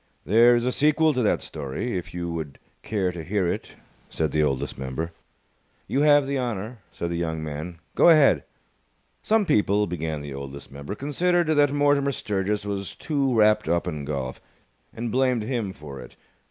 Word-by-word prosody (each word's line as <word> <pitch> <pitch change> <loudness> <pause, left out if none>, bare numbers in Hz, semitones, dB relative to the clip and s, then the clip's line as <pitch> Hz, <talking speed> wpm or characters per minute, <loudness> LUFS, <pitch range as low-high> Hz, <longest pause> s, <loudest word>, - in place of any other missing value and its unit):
"There 115 +4 +6
is 120 0 0
a 125 - +1
sequel 155 +3 +3
to 130 - 0
that 110 - +2
story, 75 - -4
if 90 - -4
you 85 -1 -4
would 80 -4 -5 0.2
care 95 -4 -1
to 85 -2 -7
hear 95 +2 0
it," - - -4 0.3
said 80 -3 -1
the 75 - +1
Oldest 70 -3 -1
Member. 65 +6 -4 0.7
"You 135 - 0
have 145 -1 +5
the 140 0 -1
honour," 115 -1 -4
said 85 - -4
the 85 - -2
young 80 -2 -2
man. 80 +3 -6 0.2
"Go - - +6
ahead!" 140 - +5 0.8
Some 220 -1 +2
people 105 - +2
(began 80 -4 -3
the 70 -1 -7
Oldest 70 +1 -8
Member) 70 +8 -6
considered 170 +6 +1
that 145 -2 +4
Mortimer 145 -1 +2
Sturgis 105 -1 -1
was 100 -1 -4
too 140 -5 0
wrapped 105 -3 +4
up 85 +1 +1
in 75 -4 -4
golf, 70 -3 -4 0.5
and 115 0 -4
blamed 125 -2 +2
him 115 -4 -2
for 75 -7 -10
it. - - -13
100 Hz, 180 wpm, -25 LUFS, 80-130 Hz, 0.8 s, There